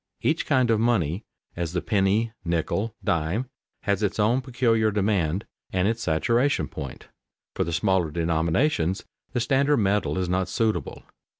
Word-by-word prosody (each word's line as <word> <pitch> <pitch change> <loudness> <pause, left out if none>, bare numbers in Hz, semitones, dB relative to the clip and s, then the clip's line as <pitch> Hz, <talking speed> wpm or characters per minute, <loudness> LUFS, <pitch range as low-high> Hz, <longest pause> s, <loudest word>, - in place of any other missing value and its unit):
Each 160 +1 +1
kind 130 -4 +3
of 110 - +3
money, 105 -6 +1 0.3
as 85 -1 -3
the 90 - 0
penny, 105 +1 +2
nickel, 90 +6 -1
dime, 90 +11 -1 0.3
has 100 -1 0
its 105 -2 0
own 115 +5 +3
peculiar 120 -4 +2
demand 100 -3 0 0.3
and 95 +1 +1
its 115 +1 -1
saturation 115 - +1
point. 70 - -8 0.4
For - - 0
the 85 - -3
smaller 90 0 +1
denominations 85 - +1 0.3
the - - +1
standard 140 +4 +2
metal 100 -2 +1
is 90 -1 0
not 95 +1 0
suitable. 110 +2 -1
100 Hz, 145 wpm, -25 LUFS, 85-115 Hz, 0.4 s, kind